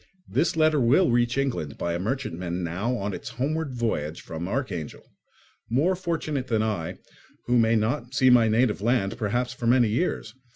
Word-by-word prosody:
This 160 - 0
letter 155 -1 +4
will 135 +7 +4
reach 120 +1 +2
England 125 - -2
by 85 - -2
a 85 - -2
merchantman 90 -6 -3
now 100 +9 -2
on 100 -1 -3
its 130 - -6
homeward 140 +5 -2
voyage 85 -10 -2
from 85 +2 -6
Archangel; 100 - -4 0.6
more 150 +11 +2
fortunate 160 -6 -3
than 110 -3 +1
I, 100 -7 -3 0.5
who 125 0 +3
may 115 0 +3
not 120 +3 -1
see 130 -2 +5
my 120 -2 +6
native 110 -2 +2
land, 115 -3 +1
perhaps, 120 +4 -1
for 120 -2 -4
many 120 -2 +4
years. 115 -3 -1
120 Hz, 170 wpm, -26 LUFS, 100-130 Hz, 0.6 s, my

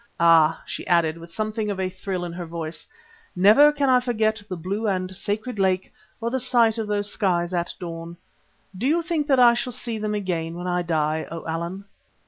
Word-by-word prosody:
Ah!" 165 -1 +5
she - - -6
added 170 -2 +2
with 170 0 -12
something 215 +2 -2
of 200 -2 -3
a 190 - 0
thrill 185 -1 -4
in 170 - -6
her 175 -1 -6
voice, 160 -1 -6 0.5
"never 215 +11 +7
can 290 -2 0
I 255 -1 +5
forget 220 -3 0
the 185 - -4
blue 200 +6 -3
of 185 -2 0
the 185 - -11
sacred 210 +4 -3
lake 190 -1 +1 0.3
or 230 0 -2
the 260 - 0
sight 235 -3 +2
of 220 - -2
those 205 0 0
skies 175 -3 0
at 175 -1 -1
dawn. 170 -1 -7 0.6
Do 220 +8 -1
you 335 +4 +2
think 325 -4 -1
that 270 -3 +4
I 240 -1 +7
shall 240 +1 -2
see 225 -1 -4
them 210 0 -2
again 170 -5 -2
when 175 +1 -6
I 180 0 0
die, 160 -2 -1
O 165 0 -7
Allan?" 170 +4 -4
190 Hz, 210 wpm, -24 LUFS, 170-225 Hz, 0.6 s, never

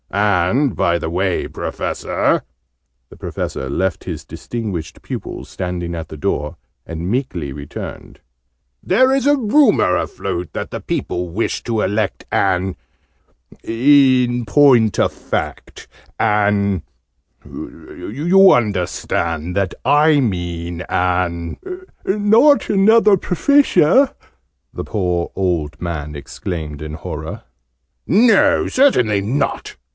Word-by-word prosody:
And, 105 - +1
by 85 +3 +1
the 80 - -4
way, 90 +1 -1
Professor!" - - -2 0.7
(The - - -14
Professor 65 - -5
left 90 +4 -1
his - - -6
distinguished 100 -9 -6
pupil - - -6
standing 90 -1 -4
at 80 -1 -6
the 80 - -8
door, 75 +1 -2 0.3
and 85 +2 -5
meekly 95 - -2
returned.) 70 -1 -8 0.6
"There 260 +8 +3
is 270 -1 +1
a 290 0 +4
rumour 225 - +3
afloat, 85 -1 -3
that - - -5
the - - -5
people 90 0 -3
wish 105 +7 -2
to 115 -3 -1
elect 105 0 -1
an 95 -1 +1 0.9
in 125 0 +3
point 120 -1 +4
of - - +2
fact, - - -5 0.3
an 100 -3 +2 0.6
you 175 - +1
understand 90 -5 -1
that 100 -2 -1
I 150 +1 +4
mean 85 -6 -3
an 90 -2 -1 0.3
" - - -40
"Not 220 +9 +4
another 210 +1 +5
Professor!" 260 - +3 0.6
the - - -5
poor 90 -5 -2
old 80 -6 -1
man 75 -4 -5
exclaimed 75 +1 -6
in 75 0 -6
horror. 75 - -7 0.6
"No! 245 - +4
Certainly 125 - +3
not!" 130 +8 -2
100 Hz, 110 wpm, -18 LUFS, -, 0.9 s, another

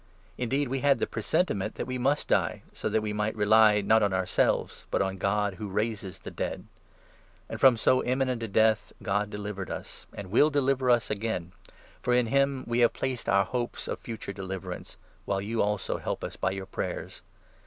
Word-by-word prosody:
Indeed, 135 +5 0
we 135 +2 -1
had 140 0 +4
the - - 0
presentiment 110 - -1
that - - -3
we 130 0 -3
must 140 +4 +1
die, - - +1
so - - -3
that 110 - +1
we 105 - -2
9 105 - -4
might 105 +1 0
rely, 105 0 +5
not 110 +3 +4
on 100 -2 +2
ourselves, 95 -1 0
but - - 0
on 95 -1 -1
God 100 +1 +1
who 105 +3 -6
raises 105 -2 -2
the - - -8
dead. - - -4 0.8
And - - -6
from 130 -3 +7
so 130 +3 +3
imminent 130 -1 0
a 115 - -2
death 110 +1 +2
God 105 +1 0
delivered 105 -2 -5
us, - - -7
and 95 -2 -7
will 145 +7 +5
10 - - -12
deliver 135 -2 +2
us 120 -3 +3
again; 105 -5 -2 0.5
for 125 -1 +2
in 125 -1 +3
him 140 +2 +1
we 120 +1 0
have 120 -1 +5
placed 130 -3 -3
our 100 0 +4
hopes 120 +4 -3
of - - -3
future 110 -4 -6
deliverance, 95 -2 -6 0.3
while 100 -1 0
you, 110 +3 -1
also, 105 -2 -1
help - - -3
us - - -5
by - - 0
your 95 0 -4
prayers. 95 - -5
110 Hz, 200 wpm, -28 LUFS, 100-125 Hz, 0.8 s, from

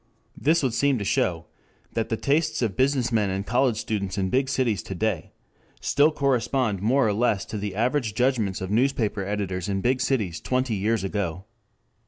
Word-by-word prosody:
This 160 +2 +2
would 130 -4 +1
seem 140 +1 +2
to 105 - -3
show 85 -3 0 0.5
that 115 -1 -1
the 110 - -1
tastes 155 +1 +1
of 105 -5 -1
business 130 -1 +1
men 105 -4 +2
and 95 +1 -2
college 125 -1 +2
students 100 -3 -3
in 95 -1 -1
big 130 +1 +1
cities 120 -8 0
to 95 - -7
day 100 -3 -2 0.5
still 145 +3 +3
correspond 130 -7 0
more 120 +4 +3
or 105 - +1
less 110 -2 +1
to 110 - -5
the 100 -2 -4
averaged 120 -1 0
judgments 120 -8 +1
of 95 +1 -4
newspaper 115 -4 +1
editors 95 -2 -3
in 95 -1 0
big 125 +3 +1
cities 105 -11 -1
twenty 130 -2 0
years 105 +1 0
ago. 95 -2 -3
110 Hz, 185 wpm, -25 LUFS, 100-130 Hz, 0.5 s, still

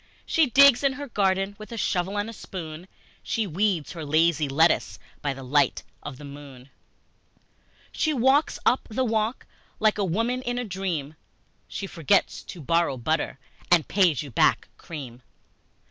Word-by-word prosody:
She 320 -3 +3
digs 275 +1 +6
in 275 -1 +3
her 285 +2 -7
garden 195 -3 0
With 215 +2 -10
a 230 - -5
shovel 190 -1 -1
and 205 +1 -1
a 230 - -7
spoon, 170 -4 -8 0.3
She 225 - -1
weeds 185 -2 0
her 165 -2 -7
lazy 155 0 +2
lettuce 160 +5 +2 0.2
By 145 -2 -2
the 135 - -9
light 140 +1 +1 0.2
of 135 -3 -8
the 145 - -10
moon, 140 -2 -12 1.2
She 315 - 0
walks 275 +3 +2
up 250 - +2
the 255 +4 0
walk 220 +1 -1 0.3
like 215 -1 +2
a - - +2
woman 230 +8 0
in 245 -1 -3
a 245 - -2
dream, 180 -7 -3 0.5
She 200 - -5
forgets 165 -7 +1
she - - -8
borrowed 165 -5 0
butter 155 -2 -1 0.3
And 175 -3 +4
pays 175 - +2
you 140 - -9
back - - +2
cream! 130 -7 -9
180 Hz, 160 wpm, -25 LUFS, 150-225 Hz, 1.2 s, digs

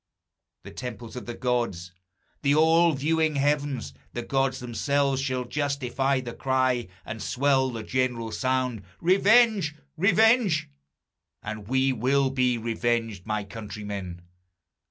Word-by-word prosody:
The - - -10
temples 120 -2 -7
of 125 - -7
the 120 - -5
gods, 120 -9 -1 0.5
the 145 0 +3
all 165 +2 +5
viewing 155 +2 +1
heavens, 140 - 0 0.2
The 120 - -4
gods 135 0 0
themselves, 135 +3 0
shall 130 -2 -2
justify 140 -1 -1
the 120 -2 -7
cry, 130 -2 0 0.2
And 110 0 -6
swell 130 0 +2
the 115 -3 -5
general 120 -2 -1
sound, 130 -3 -1 0.2
Revenge! 195 -2 +4 0.2
Revenge! 200 - +3 0.7
And 110 -1 -6
we 130 +2 +2
will 130 +3 +1
be 125 -2 +1
revenged, 115 -3 -2
my 105 -1 -1
countrymen! 100 -4 -7
130 Hz, 120 wpm, -26 LUFS, 115-145 Hz, 0.7 s, all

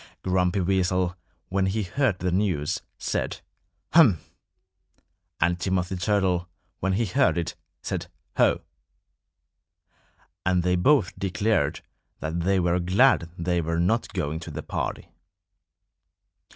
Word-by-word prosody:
Grumpy 90 +1 +1
Weasel, 90 -1 +1 0.3
when 95 0 +1
he 105 +3 0
heard 105 +2 0
the 90 -1 -1
news, 90 -6 0 0.2
said, - - -2 0.5
"Humph!" 130 - +5 1.1
And 85 +2 +2
Timothy 95 0 -1
Turtle, 90 -1 +1 0.3
when 95 +1 0
he 115 +4 +1
heard 130 +2 +2
it, 85 - -2 0.3
said, - - -3 0.3
"Ho!" - - +3 1.8
And 90 -1 +2
they 90 0 +2
both 105 +2 +3
declared 100 -4 0 0.4
that 80 +2 -3
they 95 +3 +2
were 90 0 +2
glad 90 +1 +3
they 85 0 0
were 85 +1 -1
not 110 +7 +1
going 80 -4 -2
to 85 - -8
the 80 0 -6
party. - - -4
90 Hz, 120 wpm, -26 LUFS, 85-100 Hz, 1.8 s, Humph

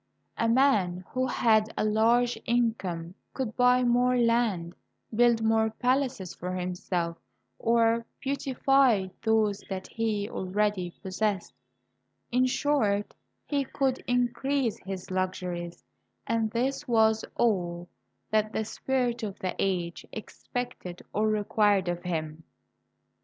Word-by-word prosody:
A 230 - +1
man 205 -9 +3
who 255 0 -1
had 220 -3 +3
a - - +1
large 235 +3 +3
income 195 -8 0 0.2
could 250 -5 -3
buy 250 0 +4
more 250 +1 +3
land, 230 -8 +1 0.4
build 235 0 +4
more 220 0 +3
palaces 245 -6 -1
for 180 +1 -5
himself, 180 -2 -2 0.4
or 230 0 +3 0.2
beautify 270 -6 +2
those 220 -3 +2
that 190 -1 -4
he 215 -3 -1
already 190 -1 -1
possessed 195 0 -1 0.4
— 130 +1 -49
in 255 +1 +3
short, 225 -7 +1 0.3
he 285 -2 0
could 265 -1 -1
increase 245 0 0
his 190 -1 -7
luxuries; 180 -2 -3 0.4
and 225 -1 0
this 250 +5 -1
was 220 -2 +3
all 175 -6 0 0.4
that 215 0 +1
the 220 - -1
spirit 250 +1 -1
of 205 -3 -4
the 185 - -3
age 175 -3 -1
expected 220 -5 -6
or 215 +1 +1
required 205 -2 +2
of 175 0 -2
him. 160 -3 -4
220 Hz, 120 wpm, -28 LUFS, 185-245 Hz, 0.4 s, buy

